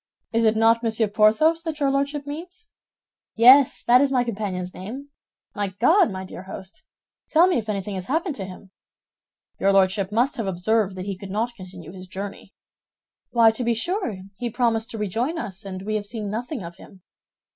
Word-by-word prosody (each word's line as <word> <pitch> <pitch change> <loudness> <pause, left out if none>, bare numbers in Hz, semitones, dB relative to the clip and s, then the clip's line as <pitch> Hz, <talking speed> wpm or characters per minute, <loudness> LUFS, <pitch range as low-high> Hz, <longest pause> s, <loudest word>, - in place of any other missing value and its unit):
It 230 0 +2
is 220 0 +3
not 225 +1 +4
Monsieur 225 -1 +1
Porthos 220 +11 +3
that 320 -2 -5
your 280 -2 +2
Lordship 280 +1 -1
means?" 355 +9 -8 0.7
"Yes, 255 +4 +6
that 245 +2 +5
is 280 -1 +2
my 250 -2 +2
companion's 195 -6 -4
name. 260 +10 -8 0.4
My 200 -2 -3
God, 340 - +5
my 190 -1 -6
dear 185 - -9
host, 190 0 -10 0.4
tell 330 +2 +6
me 365 -6 +2
if 220 -1 -7
anything 200 -1 -3
has 185 -1 -5
happened 320 +2 -1
to 195 - -4
him?" 185 +1 -12 0.9
"Your 195 - +3
Lordship 195 0 +2
must 250 +7 +1
have 225 -4 -2
observed 195 +2 0
that 185 0 -6
he 200 -1 -3
could 200 -1 -8
not 225 +5 -1
continue 180 -5 -11
his 185 0 -10
journey." 195 +1 -8 0.7
"Why, 230 -2 +5
to 225 +3 -4
be 235 0 +1
sure, 235 - -2 0.2
he 245 -1 -2
promised 230 -1 0
to 230 - -6
rejoin 230 - -2
us, 200 - -6
and 190 -1 -6
we 215 +2 -3
have 205 -1 -5
seen 215 -2 -5
nothing 240 +2 -4
of 170 +1 -9
him." 190 -1 -16
220 Hz, 190 wpm, -23 LUFS, 195-260 Hz, 0.9 s, Yes